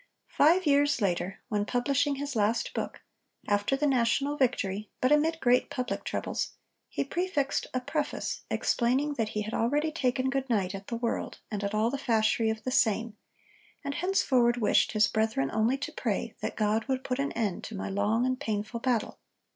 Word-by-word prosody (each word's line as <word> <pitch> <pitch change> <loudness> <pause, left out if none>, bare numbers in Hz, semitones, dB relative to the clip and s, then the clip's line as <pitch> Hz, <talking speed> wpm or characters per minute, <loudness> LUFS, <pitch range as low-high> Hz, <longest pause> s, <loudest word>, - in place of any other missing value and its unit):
Five 340 +5 +4
years 285 -1 +3
later, 185 -2 -1
when 210 -3 0
publishing 280 +5 +1
his 280 -1 -4
last 220 +2 +1
book, - - -4 0.5
after 205 +5 +2
the 290 +2 0
national 275 +2 +2
victory 215 -7 0
but 255 - +2
amid 320 +2 +3
great 250 -2 +3
public 250 -1 -3
troubles, - - -3 0.4
he - - -1
prefixed 340 -6 -1
a 255 - -1
preface 295 +3 -2
explaining 265 +5 +1
that 225 -6 -1
he 210 - 0
had 215 +2 -6
already 295 +7 +1
'taken 260 -3 0
good 270 -1 -2
night 195 -5 +1
at 195 0 -7
the 235 - -3
world 235 0 -2
and 205 -1 -3
at 200 +1 -2
all 220 +2 +2
the 280 - -3
fasherie 225 -2 +2
of 220 -1 -3
the 255 - -2
same,' 225 -3 +2 0.7
and 280 - -2
henceforward 260 -10 +2
wished 230 0 +3
his 215 -1 +4
brethren 220 -12 0
only 225 +5 +2
to 275 - -5
pray - - -2
that - - -4
God 215 +1 +1
would 265 -1 -1
'put 255 0 -2
an 280 +1 0
end 210 -6 -2
to 225 - -7
my 190 - -4
long 210 +5 +1
and 255 0 0
painful 215 -2 -3
battle.' 235 -3 -1
245 Hz, 185 wpm, -29 LUFS, 215-280 Hz, 0.7 s, Five